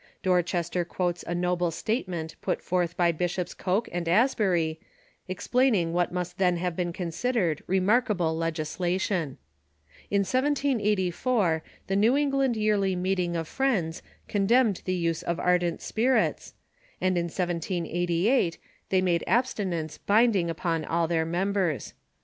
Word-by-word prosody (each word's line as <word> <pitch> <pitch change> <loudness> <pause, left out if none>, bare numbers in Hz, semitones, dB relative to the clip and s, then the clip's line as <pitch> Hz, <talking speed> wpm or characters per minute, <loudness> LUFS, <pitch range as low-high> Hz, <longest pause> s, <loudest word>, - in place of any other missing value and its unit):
Dorchester 175 -1 +1
quotes 175 0 -2
a 175 - -2
noble 180 0 0
statement 175 - -3
put - - -1
forth 175 -2 -1
by 175 -1 +4
Bishops 175 +2 -2
Coke 195 +5 -1
and 170 -1 -2
Asbury, 180 -7 +2 0.5
explaining 190 -2 +1
what 175 0 +1
must 180 0 -4
then 180 -2 +3
have 175 -1 -2
been 175 -1 -1
considered 175 - -1
remarkable 190 -3 +2
legislation. 165 0 -1 0.7
In 200 0 +2
1784, 215 - +1 0.2
the 195 - -1
New 225 +7 +4
England 275 -4 +1
Yearly 205 -3 +1
Meeting 180 -1 0
of 165 -1 -2
Friends 205 -12 0 0.3
condemned 215 +1 +2
the 185 - 0
use 165 -2 -1
of 170 - -2
ar 180 0 +3
dent 175 -2 -3
spirits, 250 +4 0 0.4
and 185 0 +1
in 170 -1 +1
1788 175 - 0 0.3
they 190 -1 +3
made 175 -2 +1
abstinence 185 - -1
binding 205 -5 +3
upon 165 -1 -1
all 165 +1 0
their 160 -1 +1
members. 180 -2 -1
180 Hz, 130 wpm, -27 LUFS, 170-205 Hz, 0.7 s, by